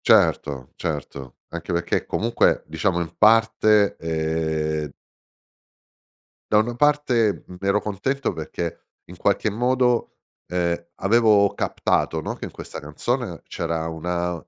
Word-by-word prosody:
Certo, 70 0 +3
certo, 70 -5 -5
anche 85 +2 -6
perché 85 0 -1
comunque 115 +2 +2
diciamo 85 +3 0
in 85 0 -5
parte 110 -1 +4
e 80 -2 -1 1.6
da 105 - +5
una 115 +3 +1
parte 125 -6 +2
mh, 90 - -10
ero 100 +1 +2
contento 120 +7 -2
perché 85 +1 -5 0.2
in - - -12
qualche - - +1
modo 125 +2 +1 0.3
ehm 85 -1 -1 0.2
avevo 105 -1 +4
captato, 80 - 0
no, - - -4
che - - -12
in - - -8
questa - - -8
canzone 90 - -3
c'era 80 -1 -2
una 85 +2 -2
90 Hz, 120 wpm, -23 LUFS, 80-110 Hz, 1.6 s, da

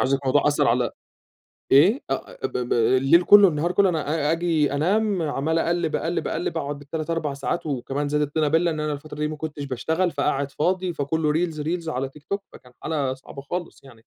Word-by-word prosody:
الموضوع 135 +1 +2
أثّر 145 -1 +2
على 120 0 +2 0.8
إيه 185 - +5
أ - - -4
ب - - -5
ب 125 -1 -1
الليل 130 +8 +4
كلّه 205 +2 +8
النهار 165 +1 0
كلّه 195 +1 +3
أنا 155 -2 -1
أ - - +3
آجي 165 -3 +1
أنام 195 +6 +1
عمّال 160 +1 0
أقلّب 170 -1 0
أقلب 170 +2 -2
أقلّب، 165 0 -2
أقعد 145 -2 -4
بال3 155 +2 -5
4 165 -4 -1
ساعات 140 +5 -3
وكمان 140 0 -2
زاد 150 +1 +1
الطينّة 150 +1 0
بلّة 165 +3 +2
إن 155 - -4
أنا 150 0 -1
الفترة 150 +1 -9
دي 150 - 0
ما 155 - -5
كُنتش 150 -2 -5
باشتغل 160 +7 -1
فقاعد 140 -1 -1
فاضي 180 +5 0
فكلّه 150 +1 0
reels 165 +1 0
-reels 165 +3 -3
على 135 -2 -2
تيك 145 +2 -17
توك 200 +5 -3
فكان 125 - -15
حالة 145 -4 -1
صعبة 135 +1 -11
خالص 175 +5 -6
يعني، 115 -4 -17
150 Hz, 200 wpm, -24 LUFS, 140-170 Hz, 0.8 s, كلّه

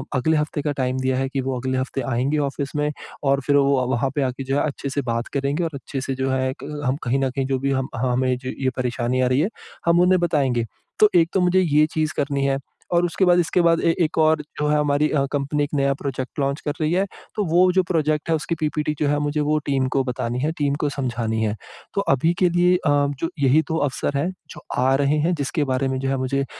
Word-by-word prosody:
अगले 155 +5 +2
हफ्ते 150 0 -1
का 145 - -1
टाइम 130 0 0
दिया 130 0 0
है 135 0 -1
कि 135 0 -2
वो 130 -1 -2
अगले 130 +1 -1
हफ्ते 130 +1 -2
आएँगे 135 +5 0
ऑफ़िस 140 0 -5
में 150 0 0 0.3
और 140 0 +2
फ़िर 145 - +4
वो 140 -2 +3
वहाँ 130 +1 0
पे 145 - +1
आके 130 0 -2
जो 135 +1 -1
है - - +2
अच्छे 140 -1 -4
से 140 +1 -1
बात 115 +1 -2
करेंगे 140 +4 0
और 165 - -2
अच्छे 135 0 -5
से 130 0 -3
जो 130 +1 -1
है 130 0 0
क - - -6 0.2
हम 130 +1 +1
कहीं 125 +2 +1
न 135 -1 +1
कहीं 135 +1 -2
जो 135 -1 0
भी 140 +1 -1
हम 130 -1 0
हमें 125 +1 +1
जो 130 +1 -6
ये 130 -1 +1
परेशानी 125 0 -1
आ 130 - +3
रही 130 +2 +2
है, 170 +7 +1 0.4
हम 170 0 +4
उन्हें 180 +1 +4
बताएँगे। 135 -9 +1 0.3
तो 215 - +7
एक 165 -1 +5
तो 195 - +2
मुझे 180 +1 +3
ये 155 -5 +2
ये 155 - +6
चीज़ 155 -1 0
करनी 140 -1 0
है 135 0 +1 0.4
और 175 0 +3
उसके 175 +3 +1
बाद 175 0 +5
इसके 175 +1 +2
बाद 165 -1 +3
ए 165 - +3
एक 155 - -2
और 160 -1 +4 0.2
जो 150 - +1
है 150 - +2
अ, - - +2
हमारी 145 0 +2 0.2
कंपनी 145 +1 0
एक 145 - -2
नया 140 -1 +2
प्रोजेक्ट 135 -1 -5
लॉन्च 140 +1 0
कर 145 - 0
रही 155 0 +1
है। 190 +2 +2 0.3
तो 210 - 0
वो 180 +2 +5
जो 185 +1 +3
प्रोजेक्ट 155 -3 0
है 165 - +3
उसकी 160 +2 -2
पीपीटी 150 0 -1
जो 150 - +1
है 145 0 +1
मुझे 145 +1 -1
वो 150 +1 +1
टीम 135 -2 +1
को 135 - +3
बतानी 125 -1 -3
है, 150 +4 0
टीम 145 -4 -1
को 150 - 0
समझानी 120 -5 -2
है। 105 -1 0 0.4
तो 200 - +2
अभी 160 +6 +2
के 180 - +4
लिए 175 +1 +3
अ, 170 -4 0 0.3
जो 165 - -1
यही 140 +3 +4
2 160 - 0
अवसर 145 -1 -1
हैं 150 +6 0 0.2
जो - - -10 0.2
आ 130 +1 +3
रहे 140 +2 +2
हैं 175 - +2
जिसके 145 0 -1
बारे 135 0 0
में 130 0 -1
जो 135 0 -2
है 135 - 0
मुझे 130 +1 -1
अ, - - -1
140 Hz, 265 wpm, -22 LUFS, 130-155 Hz, 0.4 s, तो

